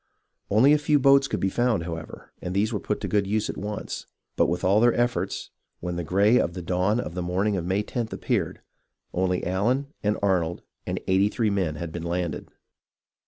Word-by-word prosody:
Only 125 +8 +6
a 150 - +4
few 150 0 +3
boats 140 0 +5
could - - -2
be 95 - 0
found, 120 -6 +1
however, 80 -1 -8
and 90 +1 -4
these 105 +3 +1
were 105 - -1
put 105 - -3
to - - -2
good 100 -2 +1
use 105 +1 0
at - - -12
once; 105 +1 -5 0.3
but - - +3
with 85 - -2
all 100 +3 +4
their 120 +1 +4
efforts, 120 0 -1 0.3
when 90 0 -4
the 85 - -2
gray 100 +8 +4
of 85 - -1
the 90 - -5
dawn 90 +6 +1
of 105 - -4
the 90 - -3
morning 95 +4 0
of 90 -2 -3
May 100 +3 0
loth 115 -3 -1
appeared, - - -2 0.5
only 90 0 0
Allen, 125 +10 0
and 105 +1 +1
Arnold, 90 -4 +1 0.2
and - - -2
eighty 95 +2 +3
three 110 -1 0
men 90 -6 0
had 85 +1 -5
been 85 - -5
landed. 85 0 -3
100 Hz, 210 wpm, -25 LUFS, 90-110 Hz, 0.5 s, Only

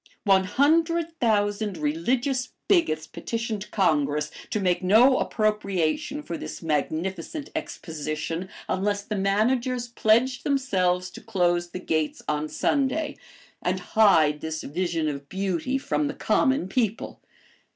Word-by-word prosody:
One 195 -2 +4
hundred 330 - +2
thousand 205 -3 +1
religious 240 - -1
bigots 155 - +2
petitioned 220 +1 -4
Congress 150 -6 +1 0.2
to 215 - -1
make 180 -2 +1
no 225 +8 +5
appropriation 215 - 0
for 170 - -5
this - - -7
magnificent 165 - -2
Exposition, 160 - -4 0.2
unless 205 +1 0
the 210 - -4
managers 240 +5 +1
pledged 235 +2 +2
themselves 185 -10 +1
to - - -10
close 175 -5 0
the 185 - -6
gates 155 -4 -1
on 150 0 -1
Sunday, 285 - 0 0.5
and - - 0
hide 160 -9 +5
this 160 0 -4
vision 165 0 -1
of 140 -1 -5
beauty 195 +6 -1
from 290 +2 -1
the 280 - -4
common 265 - +2
people. 225 0 -2
200 Hz, 120 wpm, -25 LUFS, 165-250 Hz, 0.5 s, no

